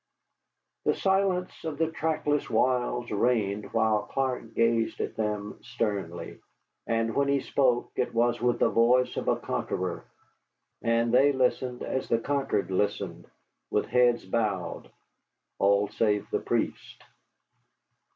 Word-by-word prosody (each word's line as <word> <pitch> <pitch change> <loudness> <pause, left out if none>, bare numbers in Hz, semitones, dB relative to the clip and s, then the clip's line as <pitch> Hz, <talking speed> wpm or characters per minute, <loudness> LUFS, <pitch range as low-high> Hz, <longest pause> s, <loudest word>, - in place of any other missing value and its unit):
The - - +2
silence 190 -2 0
of 160 -3 -4
the 160 +1 0
trackless 155 -2 -1
wilds 125 -1 +1
reigned 105 -2 0
while 110 -1 +2
Clark 130 -4 -2
gazed 115 -1 +1
at - - -3
them 105 -1 -3
sternly. 100 -6 -4 0.5
And 115 0 0
when 140 +3 +1
he 140 0 +2
spoke 125 -3 +1
it 125 - 0
was 120 0 +1
with 120 0 +2
the - - +3
voice 125 +2 +3
of - - -4
a - - +3
conqueror, 90 -1 -3 0.8
and 115 0 +1
they 135 +3 +6
listened 125 -1 0
as 130 - -3
the 115 - +3
conquered 135 -7 -1
listen, 95 -3 -2 0.4
with - - +1
heads 120 -4 +3
bowed 100 -3 -2 0.7
all 100 +1 +3
save 105 -1 0
the - - +1
priest. - - -3
115 Hz, 130 wpm, -28 LUFS, 105-130 Hz, 0.8 s, they